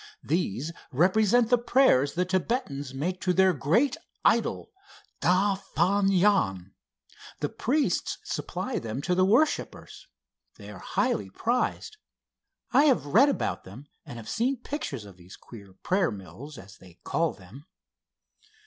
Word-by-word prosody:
These 155 - -1 0.2
represent 215 - +3
the 245 - +5
prayers 235 - +3
the 180 +1 +1
Thibetans 180 - -2
make 175 +8 -3
to 180 - +1
their 190 0 +4
great 210 - +1 0.3
idol, - - +1 0.5
Da 195 +3 +3
Fan 195 +1 0
Jan. 175 - +1 0.7
The - - -2
priests 265 - -1
supply - - -4
them 115 +4 -5
to 180 - 0
the 185 +1 +3
worshippers. 290 - 0 0.5
They 105 -1 -11
are 95 - -10
highly 95 - -1
prized. 245 - -2 0.7
I 280 +4 +5
have 265 - +3
read 225 - +5
about 280 - -2
them, 115 +10 -12 0.2
and 120 - -10
have 115 - -10
seen 255 +4 0
pictures 225 - -5
of 100 -3 -14
these 90 +1 -14
queer 100 -5 -13
prayer 185 -1 +1
mills, 115 +8 -10
as 95 -1 -13
they 90 -2 -17
call 165 -1 0
them." 110 - -15
180 Hz, 140 wpm, -27 LUFS, -, 0.7 s, the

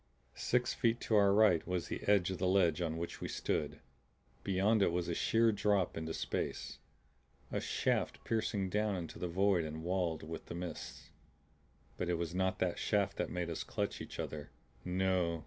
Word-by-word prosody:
Six 125 0 +1
feet 115 -1 +1
to 110 - +1
our 100 -1 +6
right 100 -5 +4
was 90 -2 -1
the - - -4
edge 100 -3 +4
of 95 - -4
the 90 - +1
ledge 90 -3 +3
on 80 -1 -1
which 85 +1 -5
we - - -2
stood; 75 - -2 0.6
beyond 100 +3 +2
it 95 - +4
was 85 0 -1
a 85 - -1
sheer 115 +6 +3
drop 100 -3 +1
into 80 0 -4
space. - - -3 0.7
A - - 0
shaft - - 0
piercing 110 -3 0
down 105 +1 +1
into 85 -3 -6
the 90 - -2
void 95 0 +2
and 80 +1 -5
walled 90 -3 -1
with 80 +1 -7
the - - -6
mists. 85 -2 -7 0.9
But 90 - -2
it 90 - +2
was 85 0 -3
not 95 0 +1
that 90 -2 0
shaft 100 -3 +1
that - - -1
made 85 -1 -2
us 80 - -3
clutch - - -3
each - - -8
other. 75 -1 -4 0.3
No! 90 -2 +1
90 Hz, 185 wpm, -34 LUFS, 85-100 Hz, 0.9 s, our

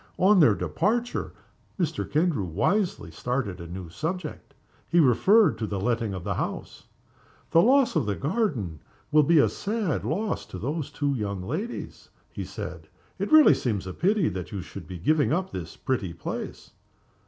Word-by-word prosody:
On 195 +1 +5
their 150 - +6
departure 235 +6 -1 0.5
Mr. 165 -3 -2
Kendrew 155 - +1
wisely 120 - 0
started 105 -1 -3
a 85 - -7
new 90 +1 -7
subject. 160 - -5 0.3
He 175 - +4
referred 180 - +5
to 110 - -2
the 100 -2 -3
letting 115 -1 -1
of 90 - -6
the - - -1
house. - - -5 0.7
"The 165 - +6
loss 260 +3 +4
of 145 -9 +1
the 100 - 0
garden 135 - -1 0.3
will 150 0 +6
be 165 +3 +4
a 145 - +6
sad 205 -6 -2
loss 205 +7 -2
to - - -8
those 145 - -3
two 145 -2 -1
young 100 -6 -3
ladies," 170 - -5 0.2
he - - -5
said. - - -7 0.3
"It - - -2
really 310 -1 +8
seems 105 -6 -1
to 95 -1 -6
be - - -19
a - - -24
pity 195 -1 +3
that 90 -2 -6
you 100 -4 -4
should 90 -2 -10
be 90 - -7
giving 145 - +2
up 185 +4 0
this 85 -2 -7
pretty 100 -10 -2
place." 85 - -6
145 Hz, 175 wpm, -26 LUFS, -, 0.7 s, really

